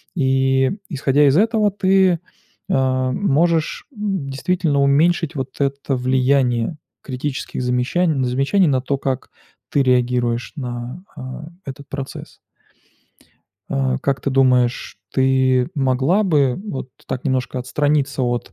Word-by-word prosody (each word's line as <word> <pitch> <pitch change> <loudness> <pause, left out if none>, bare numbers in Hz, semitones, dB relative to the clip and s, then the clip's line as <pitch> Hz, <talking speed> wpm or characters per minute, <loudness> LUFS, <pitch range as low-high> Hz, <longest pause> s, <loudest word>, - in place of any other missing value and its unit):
И 135 +1 +2
исходя 145 -2 +2
из 140 +4 +4
этого 215 -1 +3
ты, 190 -3 +3 0.5
а, 130 -4 +1
можешь 165 -1 +1
действительно 175 - -1
уменьшить 155 +3 +2
вот 130 -1 -3
это 140 0 -1
влияние 130 +1 +1 0.3
критических 130 0 -4
замещан 130 +4 +1
замечаний 135 +9 +2
на 130 -3 +2
то, 140 +1 -1
как 135 -2 -3 0.4
ты 140 - +3
реагируешь 125 -2 +1
на, 125 +3 -6
а, 130 +3 -7 0.2
этот 140 0 -9
процесс. 135 -1 -7 1.3
А, 65 -1 0
как 135 -1 -1
ты 140 - -2
думаешь, 125 -2 +2
ты 130 -1 +2
могла 135 +8 +2
бы 140 -8 +2
вот 135 -11 -5 0.2
так 130 - -4
немножко 130 -1 -1
отстраниться 145 +1 0
от, 120 -4 -2
135 Hz, 115 wpm, -20 LUFS, 130-150 Hz, 1.3 s, из